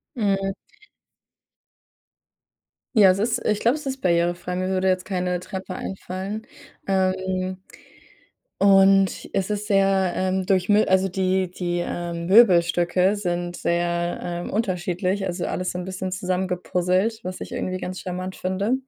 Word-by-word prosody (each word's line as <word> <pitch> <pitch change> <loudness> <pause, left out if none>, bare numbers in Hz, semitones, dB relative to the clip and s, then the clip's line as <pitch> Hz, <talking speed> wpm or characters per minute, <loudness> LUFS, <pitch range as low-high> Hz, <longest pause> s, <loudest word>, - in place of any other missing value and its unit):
Mhm. 195 -4 0 2.4
Ja, 205 -4 +7
es 185 - -1
ist 230 +2 -1
ich 210 -1 +1
glaube, 235 +4 +3
es 300 - -10
ist 270 0 -4
barrierefrei. 175 0 0
Mir 185 0 -1
würde 190 0 +1
jetzt 185 -1 0
keine 180 -2 -1
Treppe 190 +1 -6
einfallen, 195 +3 -5 0.4
ähm, 185 -1 0 1.0
und 195 -1 +4
es 195 0 0
ist 210 0 -3
sehr, 195 -2 +3
ähm, 185 0 0
durchmi 195 +2 +3
also, 190 0 +3
die 185 0 0
die, 175 -1 -2
ähm, 170 -1 -4
Möbelstücke 180 -1 +4
sind 175 -3 -3
sehr, 175 0 -1
ähm, 175 0 -4
unterschiedlich, 185 -1 -1
also 175 -1 -3
alles 185 0 -2
so - - -5
'n 180 - -5
bisschen 185 0 -4
zusammengepuzzelt, 185 +3 -1
was 185 0 -5
ich - - -8
irgendwie 185 0 -2
ganz 185 0 -6
charmant 185 +1 -5
finde. 190 +5 -1
185 Hz, 135 wpm, -23 LUFS, 180-195 Hz, 2.4 s, Ja